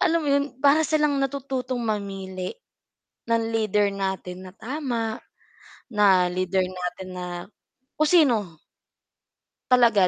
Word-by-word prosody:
alam 335 -1 +3
mo 290 - -2
'yun, 280 0 +3 0.2
para 290 +2 +5
silang 300 -2 +2
natututong 260 -2 -2
mamili 195 -4 -3 0.8
ng 230 0 +2
lider 210 -2 +2
natin 190 -1 -4
na 185 - -13
tama, 235 -3 -3 0.7
na 195 -4 +5
lider 185 +1 +1
natin 180 0 -5
na 180 - -4 0.7
kung 310 - +4
sino. 225 - +3 1.1
Talaga, 235 -6 +6
215 Hz, 115 wpm, -25 LUFS, 190-270 Hz, 1.1 s, Talaga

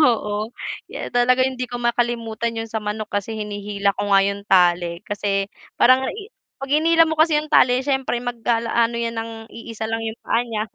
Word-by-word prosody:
Oo, 215 -6 +1 0.4
ye - - -7
talaga 250 +1 +3
hindi 255 -1 -3
ko 245 - -5
makalimutan 235 -1 -1
'yong 225 0 -4
sa 220 0 -2
manok 210 +1 -4
kasi 205 +2 -2
hinihila 205 -1 -2
ko 200 - -4
nga 195 -1 +6
'yong 200 0 -2
tali, 175 -1 +3
kasi 205 -1 -1 0.3
parang 260 +1 +4
i 425 +2 -8 0.2
'pag 270 0 -7
hinila 330 +2 +5
mo 320 - -2
kasi 315 -1 +4
'yong 300 0 -3
tali, 255 +1 +4
siyempre 265 -3 0
mag-ala 235 -1 -1
ano 235 0 +2
'yan 235 0 -2
ng 225 0 -4 0.2
iisa 230 -1 -7
lang 225 +1 -2
'yong 225 0 -4
paa 230 - +2
niya. 225 -3 -3
230 Hz, 190 wpm, -21 LUFS, 210-250 Hz, 0.4 s, nga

